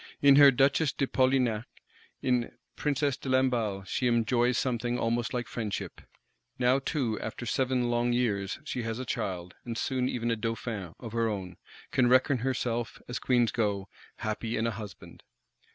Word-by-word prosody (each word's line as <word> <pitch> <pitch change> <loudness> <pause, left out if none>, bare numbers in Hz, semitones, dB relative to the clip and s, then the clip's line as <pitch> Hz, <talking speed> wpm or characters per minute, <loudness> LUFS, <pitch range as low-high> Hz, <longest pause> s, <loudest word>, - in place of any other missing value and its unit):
In 140 -1 +7
her 145 -1 +10
Duchess 135 +3 +3
de 135 - 0
Polignac, 130 -4 +2 0.6
in 125 -2 0 0.2
Princess 145 -2 0
de 135 - -6
Lamballe, 120 -7 +1
she 125 +5 0
enjoys 120 +1 +2
something 120 -1 0
almost 120 0 0
like 120 -2 -2
friendship; 110 -4 -4 0.6
now 125 +1 +3
too, 130 -6 -1
after 110 +2 -5
seven 125 0 +1
long 120 0 +1
years, 105 -6 0
she 130 -4 -3
has 115 -1 -3
a 130 - -4
child, 90 -6 -3
and 115 -1 -5
soon 130 0 0
even 120 -1 -1
a - - +2
Dauphin, 110 -5 -4
of 115 -3 -7
her 115 0 +1
own; 95 -4 -5 0.3
can 125 -2 +3
reckon 130 +1 +4
herself, 120 -2 -2
as 120 - -3
Queens 120 -3 +2
go, 100 -4 -1 0.3
happy 110 +1 -3
in 110 - 0
a 115 - +1
husband. 105 -4 -9
120 Hz, 165 wpm, -29 LUFS, 110-130 Hz, 0.6 s, her